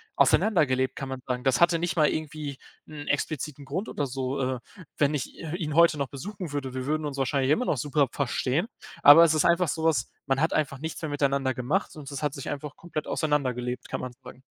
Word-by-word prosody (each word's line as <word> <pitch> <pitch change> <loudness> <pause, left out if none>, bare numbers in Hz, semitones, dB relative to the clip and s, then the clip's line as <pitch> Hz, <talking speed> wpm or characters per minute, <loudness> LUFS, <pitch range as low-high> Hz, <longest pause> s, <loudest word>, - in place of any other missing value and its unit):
auseinandergelebt, 130 -11 +3
kann 135 - -5
man 130 -1 -5
sagen. 125 -1 -2
Das 135 -1 +2
hatte 170 -1 +5
nicht 175 +2 -1
mal 155 -3 +4
irgendwie 150 -3 -4 0.3
'n 150 -1 -9
expliziten 145 -1 -2
Grund 190 +10 -3
oder 145 - -2
so, 130 +1 -3
äh, 130 -1 -1 0.4
wenn 145 0 +2
ich 135 - -4
i 165 0 -5
ihn 155 -5 -3
heute 170 -2 +6
noch 140 -2 -1
besuchen 180 - -7
würde, 135 -3 -3
wir 130 0 -3
würden 155 +2 -1
uns 140 -1 -6
wahrscheinlich 135 0 +1
immer 250 +11 +2
noch 145 - 0
super 140 +2 +1
verstehen. 140 - 0 0.4
Aber 145 +4 +10
es 165 -2 +4
ist 155 - +2
einfach 170 +1 +4
sowas 160 -5 0 0.2
man 135 -1 +1
hat 160 - +2
einfach 140 -3 0
nichts 160 +2 -5
mehr 160 - -3
miteinander 140 -2 +1
gemacht 140 +11 -1
und 145 -3 -9
es 140 0 -5
hat 145 -2 0
sich 140 - -6
einfach 145 0 -5
komplett 160 -3 -5
auseinandergelebt, 125 -5 -1
kann - - -3
man 125 -1 -6
sagen. 125 0 -12
145 Hz, 220 wpm, -27 LUFS, 130-155 Hz, 0.4 s, Aber